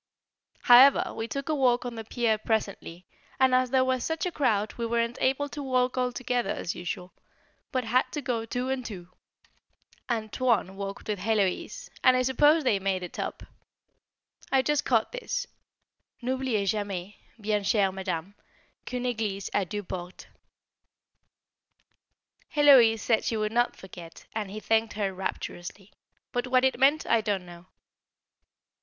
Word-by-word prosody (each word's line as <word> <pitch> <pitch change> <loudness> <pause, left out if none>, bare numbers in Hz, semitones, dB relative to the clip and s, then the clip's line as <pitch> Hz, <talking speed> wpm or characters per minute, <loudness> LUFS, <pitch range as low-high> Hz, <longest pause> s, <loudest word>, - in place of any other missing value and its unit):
However 255 +3 +7
we 225 - -4
took 275 +4 -5
a 315 - 0
walk 250 -4 +2
on 245 - -4
the 225 -1 -6
pier 225 -1 0
presently, 200 -5 -3 0.3
and 260 -1 +4
as 255 0 +3
there 260 0 +3
was 255 -1 0
such 320 +1 -2
a 360 - -1
crowd 220 -9 0
we 235 - -4
weren't 235 +1 -1
able 270 +2 +1
to 290 - -6
walk 255 -2 +1
all 250 -1 0
together 245 -3 -2
as 175 - -3
usual, 180 +1 -6 0.6
but 255 -1 0
had 245 +3 +1
to 300 - -2
go 240 -4 -1
two 245 +3 -3
and 265 -1 -2
two. 185 -7 -8 1.0
"Antoine" 225 -3 0
walked 195 +2 -6
with 210 -2 -2
Héloise, 200 -2 -1
and 255 0 +6
I 255 - +2
suppose 295 +5 +4
they 215 -7 +2
made 190 -1 -1
it 180 - -8
up. - - -4 1.1
I 265 -1 +4
just 295 +1 0
caught 225 -4 +2
this: - - -3 0.8
"N'oubliez 250 -6 0
jamais, 200 -2 -4 0.2
bien 210 -1 0
chère 195 -1 +2
Madame, 190 -1 -4 0.5
qu'une 250 -1 -3
église 215 -5 -2
a 200 - +1
deux 205 +3 -5
portes." 180 -1 -7 2.3
Héloise 260 -7 +7
said 225 0 +2
she 225 - -1
would 215 0 -1
not 240 +1 +1
forget, 175 -3 -12
and 215 -3 -3
he 210 +2 -6
thanked 225 0 +1
her 200 -2 -2
rapturously; 190 +1 -6 0.4
but 245 +1 -2
what 255 0 +3
it 265 - +1
meant 285 +4 +4
I 230 - +3
don't 205 -4 -2
know. 175 0 -13
225 Hz, 155 wpm, -27 LUFS, 200-255 Hz, 2.3 s, However